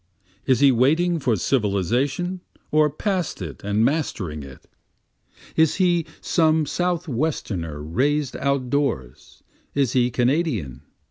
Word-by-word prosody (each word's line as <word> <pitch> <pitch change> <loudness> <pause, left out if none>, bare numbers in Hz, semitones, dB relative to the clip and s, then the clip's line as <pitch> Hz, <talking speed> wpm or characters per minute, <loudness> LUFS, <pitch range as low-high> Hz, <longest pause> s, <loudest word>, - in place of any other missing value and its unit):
Is 130 -2 +3
he 140 -1 +7
waiting 160 +8 +2
for 125 -5 +1
civilization, 125 - 0 0.3
or 155 0 +4
past 180 +3 -2
it 80 -9 -7
and 105 +2 +1
mastering 105 - -2
it? 70 -1 -12 0.9
Is 160 -1 +3
he 175 -3 +2
some 160 -2 +2
Southwesterner 140 - -2
rais'd 135 - 0
out 140 -3 -1
doors? 75 - -3 0.3
is 135 -4 +1
he 125 -1 +3
Kanadian? 120 - 0
135 Hz, 115 wpm, -23 LUFS, 105-160 Hz, 0.9 s, he